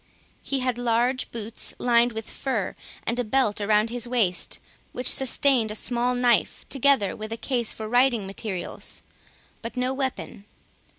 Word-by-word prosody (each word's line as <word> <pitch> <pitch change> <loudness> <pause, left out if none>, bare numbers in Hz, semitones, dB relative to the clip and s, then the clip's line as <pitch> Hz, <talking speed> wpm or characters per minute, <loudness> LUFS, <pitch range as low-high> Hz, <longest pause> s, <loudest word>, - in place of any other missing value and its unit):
He 275 -1 -1
had 250 -1 -1
large 245 +2 +1
boots 225 0 -5
lined 240 0 +3
with 220 0 -5
fur, 245 -8 -3 0.3
and 235 +2 -1
a - - +2
belt 215 -3 +1
around 210 +2 +2
his 245 0 -2
waist, 215 -8 0 0.4
which 250 0 -2
sustained 265 -3 +4
a 210 - -4
small 245 +2 +1
knife, 245 -2 +1
together 270 -7 +2
with 215 +1 -7
a 225 - -3
case 235 0 -1
for 220 - -6
writing 245 -2 +3
materials, 195 -1 -5 0.6
but 235 +2 -7
no 250 +1 0
weapon. 265 -6 -4
240 Hz, 155 wpm, -25 LUFS, 220-250 Hz, 0.6 s, sustained